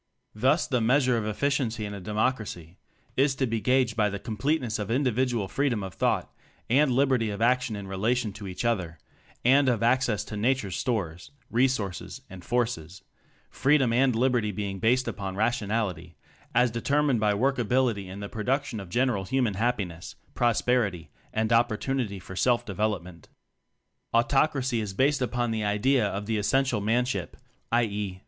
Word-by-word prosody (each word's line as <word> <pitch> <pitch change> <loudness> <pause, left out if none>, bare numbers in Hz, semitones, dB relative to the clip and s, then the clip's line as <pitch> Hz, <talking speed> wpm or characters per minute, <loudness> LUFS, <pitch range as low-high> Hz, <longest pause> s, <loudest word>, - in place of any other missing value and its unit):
Thus 130 +9 +2
the 125 -5 0
measure 125 +2 +3
of 110 -2 -1
efficiency 120 -1 -1
in 105 - -6
a 100 - -6
Democracy 105 -5 -2 0.4
is 135 +1 +2
to 135 - 0
be 115 -2 -2
gaged 125 -2 +2
by 105 -2 +2
the 100 - -4
com 110 +2 -6
pleteness 125 -2 0
of 105 0 -4
individual 125 -3 +1
freedom 115 +1 0
of 95 -1 -6
thought - - 0 0.4
and 140 +3 +4
liberty 130 -3 +2
of 100 - -5
action 120 -1 +2
in 100 -1 -6
rela 100 +6 0
tion 110 -5 -3
to 100 -1 -8
each 95 +5 -5
other 95 -8 -1 0.5
and 135 +2 +5
of 115 -2 0
access 120 -3 +2
to 105 - -8
nature's 105 -4 0
stores, 95 -6 -2 0.2
resources 115 -6 -1
and 95 -2 -10
forces 105 -7 -2 0.5
freedom 135 -3 +3
and 130 0 +3
liberty 120 -3 +1
being 100 -1 -4
based 125 +5 +2
upon 95 -2 -4
rationality 105 -6 -1 0.4
as 125 -1 +4
determined 140 +2 +1
by 105 -1 +2
work 135 +4 +1
ability 120 -4 +1
in 100 +2 -7
the 100 - -4
production 125 +3 -2
of 95 -3 -8
general 120 -2 +1
human 125 -2 0
happiness, 100 -6 -2 0.2
prosperity 110 - +1 0.2
and 110 0 0
op 120 +1 +4
portunity 110 -2 -2
for 95 +1 -10
self 120 +3 +2
development. 100 -5 -3 0.9
Autocracy 130 0 +2
is 100 -3 -5
based 135 +4 +2
upon 120 -1 -1
the 110 -1 -1
idea 110 +5 +2
of 100 +1 -4
the 110 0 -1
essential 130 +1 +1
manship 110 -5 -1 0.3
(i. 120 +1 +4
e. 100 -4 -3
115 Hz, 165 wpm, -27 LUFS, 100-130 Hz, 0.9 s, and